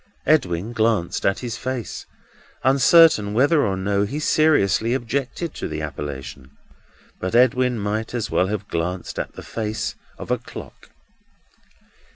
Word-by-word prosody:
Edwin 105 Hz, -, +1 dB
glanced 110 Hz, -6 st, +1 dB
at 100 Hz, -, +1 dB
his 120 Hz, -2 st, -4 dB
face, 130 Hz, -6 st, -5 dB, 0.6 s
uncertain 135 Hz, -5 st, +5 dB
whether 145 Hz, +5 st, +4 dB
or 95 Hz, -3 st, 0 dB
no 100 Hz, +1 st, 0 dB
he 105 Hz, +8 st, -2 dB
seriously 130 Hz, -, +2 dB
objected 135 Hz, +6 st, -3 dB
to -, -, -5 dB
the -, -, -4 dB
appellation. 70 Hz, -1 st, -7 dB, 0.6 s
But 95 Hz, +4 st, -3 dB
Edwin 125 Hz, 0 st, +3 dB
might 110 Hz, +3 st, -3 dB
as 115 Hz, -, -3 dB
well 90 Hz, -, +2 dB
have 105 Hz, 0 st, -4 dB
glanced 90 Hz, +2 st, -3 dB
at -, -, -4 dB
the -, -, -10 dB
face 110 Hz, -1 st, -3 dB, 0.2 s
of -, -, -7 dB
a -, -, +1 dB
clock. -, -, -11 dB
110 Hz, 140 wpm, -22 LUFS, 95-130 Hz, 0.6 s, uncertain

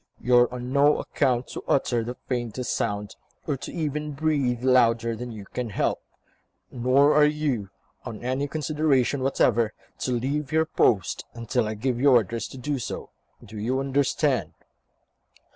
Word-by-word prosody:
You 125 Hz, +1 st, +2 dB
are 120 Hz, 0 st, +3 dB
on 125 Hz, +1 st, -5 dB
no 145 Hz, +1 st, +5 dB
account 125 Hz, -3 st, 0 dB
to -, -, -7 dB
utter 120 Hz, -4 st, +1 dB
the 120 Hz, +2 st, -5 dB
faintest 120 Hz, -1 st, -3 dB
sound, 105 Hz, -2 st, -2 dB, 0.3 s
or 140 Hz, -4 st, -2 dB
even 150 Hz, -2 st, -3 dB
to -, -, -16 dB
breathe 140 Hz, -6 st, 0 dB
louder 115 Hz, -3 st, +3 dB
than 120 Hz, +2 st, -6 dB
you 105 Hz, -3 st, -9 dB
can 120 Hz, +3 st, -4 dB
help; 100 Hz, -, -1 dB, 0.7 s
nor 130 Hz, +4 st, +3 dB
are 150 Hz, 0 st, +6 dB
you, 145 Hz, -9 st, -1 dB, 0.3 s
on 115 Hz, -2 st, -7 dB
any 130 Hz, +3 st, -1 dB
consideration 150 Hz, -3 st, +1 dB
whatever, 120 Hz, -4 st, +2 dB, 0.2 s
to 125 Hz, -, -1 dB
leave 140 Hz, +5 st, -2 dB
your 160 Hz, 0 st, +3 dB
post, 105 Hz, -, +1 dB
until 115 Hz, 0 st, -1 dB
I 110 Hz, -, -3 dB
give 120 Hz, +2 st, -1 dB
you 140 Hz, -, +6 dB
orders 115 Hz, -2 st, +2 dB
to -, -, -11 dB
do 140 Hz, +2 st, -2 dB
so. -, -, -6 dB, 0.3 s
Do 105 Hz, +1 st, -9 dB
you 125 Hz, +5 st, 0 dB
understand?" 135 Hz, -, 0 dB
125 Hz, 160 wpm, -25 LUFS, 115-140 Hz, 0.7 s, are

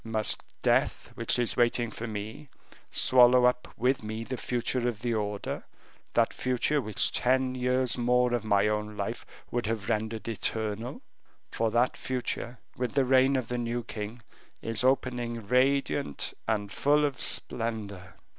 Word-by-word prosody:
Must 110 Hz, -1 st, 0 dB, 0.2 s
death, -, -, +1 dB
which -, -, +1 dB
is 120 Hz, -1 st, 0 dB
waiting 120 Hz, -1 st, +2 dB
for 115 Hz, +2 st, -6 dB
me, 110 Hz, +6 st, -6 dB, 0.4 s
swallow 125 Hz, 0 st, +6 dB
up 125 Hz, 0 st, +2 dB
with 130 Hz, +2 st, +2 dB
me 110 Hz, +1 st, -4 dB
the 130 Hz, +3 st, -4 dB
future 125 Hz, 0 st, -1 dB
of 110 Hz, -3 st, -3 dB
the 120 Hz, -1 st, 0 dB
order; 105 Hz, -2 st, -3 dB, 0.5 s
that -, -, +3 dB
future 130 Hz, +4 st, +1 dB
which 110 Hz, -4 st, +1 dB
ten 130 Hz, +1 st, +2 dB
years 125 Hz, 0 st, 0 dB
more 125 Hz, 0 st, +3 dB
of 120 Hz, -2 st, 0 dB
my 100 Hz, -1 st, +3 dB
own 105 Hz, 0 st, -2 dB
life -, -, -4 dB, 0.2 s
would 120 Hz, -2 st, -1 dB
have 110 Hz, -3 st, -2 dB
rendered 110 Hz, +1 st, -2 dB
eternal? 110 Hz, +1 st, -2 dB, 0.5 s
for 115 Hz, 0 st, 0 dB
that 120 Hz, +3 st, +2 dB
future, 125 Hz, -1 st, -3 dB, 0.2 s
with 125 Hz, +2 st, -3 dB
the 135 Hz, -2 st, +4 dB
reign 130 Hz, +1 st, +4 dB
of 130 Hz, -4 st, -1 dB
the 125 Hz, +1 st, -2 dB
new 120 Hz, 0 st, -2 dB
king, 110 Hz, +2 st, -6 dB, 0.4 s
is 115 Hz, +1 st, -1 dB
opening 125 Hz, -3 st, 0 dB
radiant 130 Hz, -, +1 dB
and 105 Hz, -2 st, -1 dB
full 150 Hz, +4 st, +3 dB
of 140 Hz, -3 st, -3 dB
splendor." 105 Hz, -6 st, -4 dB
120 Hz, 155 wpm, -29 LUFS, 110-125 Hz, 0.5 s, swallow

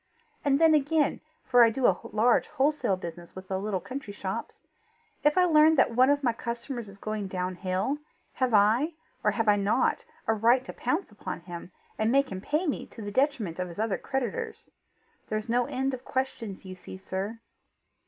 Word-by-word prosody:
And 280 Hz, -1 st, +3 dB
then 325 Hz, -1 st, +6 dB
again 300 Hz, +1 st, +2 dB, 0.2 s
for 245 Hz, -1 st, +6 dB
I 230 Hz, -, +6 dB
do 245 Hz, +3 st, -1 dB
a 190 Hz, -, +5 dB
large 230 Hz, +3 st, +3 dB
wholesale 280 Hz, -8 st, +1 dB
business 170 Hz, -1 st, -8 dB
with 185 Hz, 0 st, -9 dB
the 190 Hz, -1 st, -1 dB
little 200 Hz, -1 st, -1 dB
country 260 Hz, -1 st, -7 dB
shops 200 Hz, +2 st, -5 dB, 0.7 s
if 295 Hz, +2 st, +3 dB
I 365 Hz, -, +6 dB
learn 315 Hz, -1 st, +6 dB
that 265 Hz, -, +4 dB
one 255 Hz, +3 st, +5 dB
of 285 Hz, 0 st, +2 dB
my 240 Hz, -3 st, +2 dB
customers 235 Hz, 0 st, -5 dB
is 200 Hz, -, -13 dB
going 215 Hz, -1 st, -3 dB
down 185 Hz, 0 st, -2 dB
hill, 185 Hz, +10 st, -1 dB, 0.3 s
have 255 Hz, -2 st, 0 dB
I, 225 Hz, +10 st, +4 dB, 0.3 s
or -, -, +4 dB
have 225 Hz, -2 st, -1 dB
I 205 Hz, 0 st, +5 dB
not, 200 Hz, +1 st, +1 dB, 0.2 s
a 225 Hz, -, +3 dB
right 235 Hz, +4 st, +3 dB
to -, -, -7 dB
pounce 300 Hz, -, -2 dB
upon 205 Hz, -4 st, -6 dB
him, 175 Hz, +1 st, -9 dB, 0.3 s
and 220 Hz, +1 st, +2 dB
make 275 Hz, -1 st, +3 dB
him 185 Hz, -1 st, -5 dB
pay 305 Hz, -, 0 dB
me, 295 Hz, -, -2 dB
to 225 Hz, -, -10 dB
the 205 Hz, -, -5 dB
detriment 230 Hz, -, 0 dB
of 180 Hz, -, -1 dB
his 170 Hz, -, -10 dB
other 215 Hz, -2 st, 0 dB
creditors? 435 Hz, -, -4 dB, 0.6 s
There's 215 Hz, 0 st, -2 dB
no 240 Hz, +1 st, +1 dB
end 265 Hz, -1 st, -1 dB
of 250 Hz, -, -6 dB
questions, 230 Hz, -7 st, -3 dB
you 185 Hz, -, -7 dB
see, 185 Hz, 0 st, -10 dB
sir." 195 Hz, +4 st, -4 dB
230 Hz, 195 wpm, -28 LUFS, 195-275 Hz, 0.7 s, then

